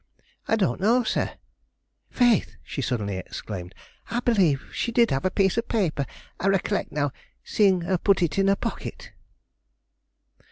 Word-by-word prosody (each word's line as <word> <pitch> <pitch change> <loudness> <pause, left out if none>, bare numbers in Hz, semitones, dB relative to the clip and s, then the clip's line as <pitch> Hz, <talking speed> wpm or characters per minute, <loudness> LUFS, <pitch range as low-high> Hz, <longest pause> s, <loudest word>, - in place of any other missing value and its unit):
"I - - +3
don't 190 -4 0
know, 235 +5 +4
sir. - - -1 0.8
Faith!" 245 -4 +2
she 140 - -5
suddenly 105 -7 -2
exclaimed, 90 0 -7 0.3
"I 235 - 0
believe 190 - +2
she 235 - -1
did 235 0 +3
have 135 +4 0
a - - +4
piece 195 +3 +2
of 230 - -4
paper. 165 - 0 0.3
I 190 - 0
recollect, 195 -2 +1
now, 145 -1 0 0.3
seeing 195 -4 +3
her 180 +1 0
put 195 -1 +3
it 170 +3 0
in 195 - +3
her 195 - +4
pocket." - - -6
190 Hz, 155 wpm, -25 LUFS, 145-220 Hz, 0.8 s, know